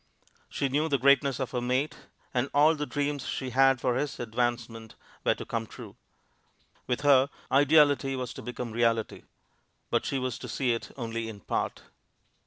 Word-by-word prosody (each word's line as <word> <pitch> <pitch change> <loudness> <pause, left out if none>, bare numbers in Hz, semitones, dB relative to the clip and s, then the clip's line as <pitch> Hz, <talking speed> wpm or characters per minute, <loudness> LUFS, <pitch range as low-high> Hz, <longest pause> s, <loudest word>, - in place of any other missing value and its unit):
She 140 - -1
knew 150 +4 0
the 140 - +2
greatness 140 0 +3
of 130 - -3
her 125 - -2
mate, 130 +4 0 0.4
and 125 +2 0
all 150 +3 +6
the 150 -2 -4
dreams 145 -1 -2
she 130 -1 -3
had 135 0 +4
for 125 - +1
his 140 +3 -2
advancement 115 -1 -3 0.3
were - - +3
to - - -8
come - - -3
true. - - -11 0.9
With 125 -1 -1
her, 140 -2 +5 0.2
ideality 145 -1 +4
was 125 -2 -4
to - - -9
become 125 0 -5
reality. 115 -1 0 0.7
But - - +2
she 135 - -2
was 130 -2 -3
to - - -7
see 130 -3 0
it 115 - -5
only 115 -2 -4
in 105 -2 -10
part. - - -3
130 Hz, 175 wpm, -28 LUFS, 120-140 Hz, 0.9 s, all